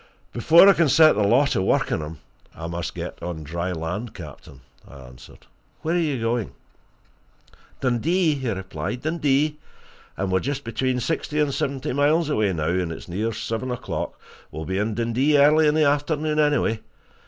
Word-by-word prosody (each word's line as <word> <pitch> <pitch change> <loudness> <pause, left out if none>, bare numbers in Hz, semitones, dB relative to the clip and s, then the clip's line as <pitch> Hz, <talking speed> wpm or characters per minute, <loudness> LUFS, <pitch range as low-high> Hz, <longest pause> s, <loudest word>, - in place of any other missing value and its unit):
"Before 165 - +6
I 200 - +8
can 170 -4 +2
set 155 +2 +6
the - - 0
law 120 +8 +4
to 140 - 0
work 95 - +1
on - - 0
him, 75 +1 -7 0.4
I 80 - -7
must 85 0 -5
get - - -7
on 85 -3 -5
dry 85 +4 -3
land, 90 +7 -5
captain," 70 -5 -11 0.3
I - - -14
answered. 65 -1 -14 0.4
"Where 160 - 0
are 175 - +2
you 150 -6 -1
going?" 115 -1 -2 1.3
"Dundee," 155 +7 +1
he 130 -4 -3
replied. 95 +3 -4
"Dundee 150 -1 0 0.6
and 95 -1 -2
we're 95 - +3
just 140 +5 -3
between 125 +2 -1
sixty 150 +3 -2
and 145 -2 +1
seventy 135 -1 -2
miles 150 +3 +2
away 110 -8 +1
now, 80 -3 -2
and 90 -1 -1
it's 80 - -8
near 105 +6 -2
seven 115 +3 -4
o'clock. 125 - -4 0.3
We'll 80 +1 -7
be 95 +5 -2
in 105 +1 -1
Dundee 120 +6 +1
early 150 +2 +5
in 150 - +2
the 155 -1 +3
afternoon, 150 +1 0
anyway. 145 -7 +2
120 Hz, 175 wpm, -23 LUFS, 95-150 Hz, 1.3 s, I